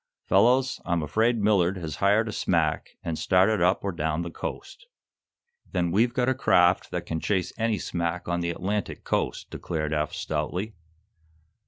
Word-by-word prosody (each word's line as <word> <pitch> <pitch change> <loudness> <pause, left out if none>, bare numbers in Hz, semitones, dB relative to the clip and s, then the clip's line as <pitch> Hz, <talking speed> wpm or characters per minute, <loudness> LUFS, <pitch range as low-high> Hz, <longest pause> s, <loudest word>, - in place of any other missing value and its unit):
Fellows, 130 +2 +3
I'm 85 -3 0
afraid 110 +10 +1
Millard 95 -3 +3
has 80 -4 -5
hired 105 +3 +3
a - - -3
smack - - -1
and 80 -2 -3
started 95 +2 +3
up 90 +2 +2
or 100 - -1
down 80 -1 -2
the 85 - -6
coast." - - -7 0.9
"Then 85 -1 0
we've 115 +6 +3
got 125 -1 +1
a 130 - +3
craft 90 -8 +3
that 90 -1 -4
can 80 -2 -3
chase 95 +1 -1
any 115 -1 0
smack 85 -1 -3
on 85 0 0
the 85 0 -1
Atlantic 100 +4 -3
coast," - - -2
declared. 75 -2 -3
Eph, 75 0 -1
stoutly. 105 +5 -3
90 Hz, 165 wpm, -26 LUFS, 85-110 Hz, 0.9 s, Fellows